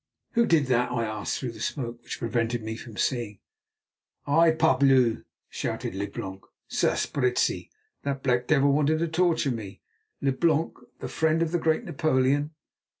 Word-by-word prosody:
"Who 235 -1 +3
did 160 -4 +4
that?" 125 -1 +1
I 115 -2 0
asked 110 -1 -3
through 125 -3 -4
the 110 - -12
smoke, 120 -1 -4
which - - -6
prevented 115 0 -1
me 110 0 -4
from 115 -2 -10
seeing. 115 -5 -1 0.9
"I, 165 +4 +5
parbleu!" 135 -7 +3 0.2
shouted - - -4
Leblanc. 95 -1 -5 0.3
"Sapristi! 125 -3 0 0.3
that 140 -1 -3
black 125 -1 +1
devil 140 -2 +4
wanted 150 +2 +2
to 170 +1 0
torture 165 -3 +1
me, 110 -5 -7 0.4
Leblanc, 155 +4 +1 0.3
the - - -3
friend 160 +1 +1
of 165 - -2
the 175 - +1
great 160 +6 +1
Napoleon. 145 - +1
135 Hz, 150 wpm, -26 LUFS, 120-155 Hz, 0.9 s, I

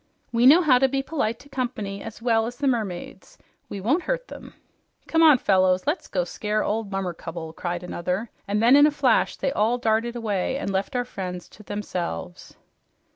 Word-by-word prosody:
"We 240 +1 +4
know 330 +6 +7
how 260 -6 +5
to 270 - +4
be 270 0 -1
polite 270 -7 -2
to 285 - -17
company 235 -7 -4
as 225 0 -9
well 225 -2 +2
as 245 - -6
the 285 - -3
mermaids. 215 -9 -3 0.3
We 200 - -5
won't 260 - +1
hurt - - -2
them." - - -11 0.5
"Come 325 - +2
on, 310 -4 +8
fellows, 185 -3 +2
let's 300 +6 -1
go 180 - -1
scare 210 +4 -2
old 215 -1 -2
Mummercubble," 170 -4 -5
cried 175 0 -4
another; 180 +5 -3 0.2
and 205 +2 0
then 245 +4 +7
in 290 +1 +7
a - - +4
flash 270 -5 +2
they 275 - -1
all 230 -1 +1
darted 230 0 0
away 220 +1 -1
and 275 - -3
left 195 +7 -2
our 245 0 0
friends 180 -6 -6
to - - -15
themselves. 185 -3 -5
225 Hz, 190 wpm, -24 LUFS, 190-260 Hz, 0.5 s, on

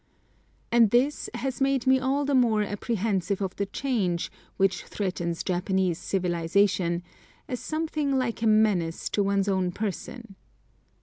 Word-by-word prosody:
And 235 -2 +5
this 255 +7 +1
has 255 +1 -3
made 270 -1 +2
me 260 0 +5
all 270 +2 0
the 285 - 0
more 230 -5 +3
apprehensive 205 -2 -1
of 190 -2 -3
the 200 - -1
change, 200 -8 -1 0.3
which 195 -1 +1
threatens 175 -4 -3
Japanese 185 -1 0
civilisation, 175 -1 +1 0.4
as 250 - -3
something 310 -3 -1
like 240 -3 -1
a 230 - +2
menace 210 -7 +2
to 205 - 0
one's 200 0 +1
own 190 -2 +1
person. 215 +3 -5
205 Hz, 135 wpm, -26 LUFS, 185-250 Hz, 0.4 s, And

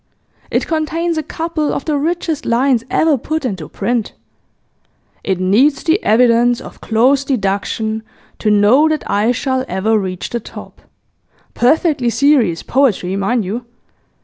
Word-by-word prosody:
It - - 0
contains 330 +1 -1
a - - -1
couple 320 0 -3
of - - -4
the 305 - 0
richest 320 +1 -2
lines 240 0 +2
ever 310 -5 +2
put 310 +3 -3
into 185 - -4
print: 240 -3 -2 1.1
It 190 -2 -1
needs 225 +11 +2
the 340 +5 +1
evidence 240 +1 +3
of - - -12
close 255 +5 +2
deduction 220 -2 -2 0.4
To 215 - 0
know 210 +9 +4
that 310 -1 -2
I 210 +4 +1
shall 260 +1 -1
ever 215 +4 +1
reach 185 -2 -5
the 235 - -2
top. - - -12 0.7
Perfectly 280 0 +2
serious 235 - +2
poetry, 215 -9 +1
mind 200 +3 0
you! 230 +6 -5
245 Hz, 140 wpm, -16 LUFS, 215-295 Hz, 1.1 s, know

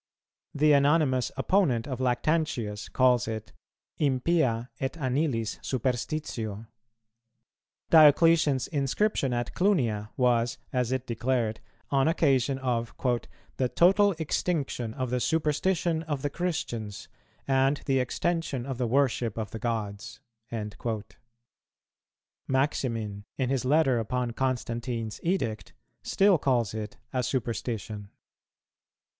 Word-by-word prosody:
The 150 +1 +4
anonymous 140 -3 +3
opponent 135 - +2
of 130 -3 -4
Lactantius 125 -5 0
calls 125 -3 +3
it, 110 -1 -5 0.5
"Impia 130 -4 +1
et 135 - -2
anilis 130 -6 -1
superstitio." 120 -4 -3 1.3
Diocletian's 155 -3 +6
inscription 140 +1 0
at 120 -1 -2
Clunia 120 - +1
was, 120 -2 +2 0.2
as 125 -1 0
it 130 -1 -1
declared, 115 -2 -1 0.3
on 135 0 +3
occasion 135 -5 +2
of 120 -3 -2 0.6
"the 130 -2 +1
total 195 +6 +4
extinction 145 -7 -2
of 130 -3 -3
the 125 - +1
superstition 160 +3 +1
of 150 -4 -4
the 145 - -1
Christians, 120 - -3 0.4
and 135 +1 +3
the 135 -1 +2
extension 145 -1 -1
of 135 -2 -5
the 125 - +1
worship 120 -3 +1
of 110 -2 -4
the 110 - -6
gods." 105 -4 -4 2.3
Maximin, 115 -7 -1
in 130 -2 0
his 135 -2 0
Letter 135 -3 +3
upon 125 +2 -2
Constantine's 120 -3 -2
Edict, 140 - -2 0.3
still 195 -4 +3
calls 120 -6 +1
it 110 -1 -6 0.2
a 130 - +1
superstition. 110 -4 -3
130 Hz, 105 wpm, -28 LUFS, 115-150 Hz, 2.3 s, Diocletian's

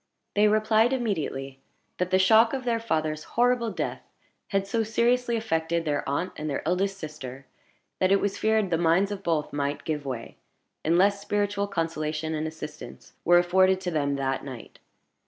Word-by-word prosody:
They 210 +1 +4
replied 215 +3 +3
immediately 150 - -2 0.4
that 180 0 0
the 185 - +4
shock 220 +5 +5
of 265 -1 -2
their 235 -2 0
father's 155 -8 -1
horrible 245 -1 +3
death - - -3 0.5
had 195 -1 0
so 225 +3 0
seriously 235 +2 +1
affected 165 -5 -1
their 145 -2 0
aunt 170 +6 -1
and 155 0 -4
their 140 +1 -3
eldest 195 +3 0
sister, 140 -6 -8 0.5
that 185 0 +3
it 195 - +5
was 200 0 -1
feared 220 -3 +1
the 165 - +2
minds 175 +4 +3
of 200 -1 -4
both 165 -5 -1
might 145 0 -2
give 150 -2 -2
way, 125 -4 -6 0.5
unless 195 +5 +3
spiritual 205 0 -1
consolation 160 -3 -2
and 155 0 -2
assistance 155 -1 -9
were 175 0 +6
afforded 185 +2 +4
to 180 -1 -3
them 140 -3 0
that 135 -1 -1
night. 130 -4 -9
180 Hz, 170 wpm, -26 LUFS, 155-205 Hz, 0.5 s, were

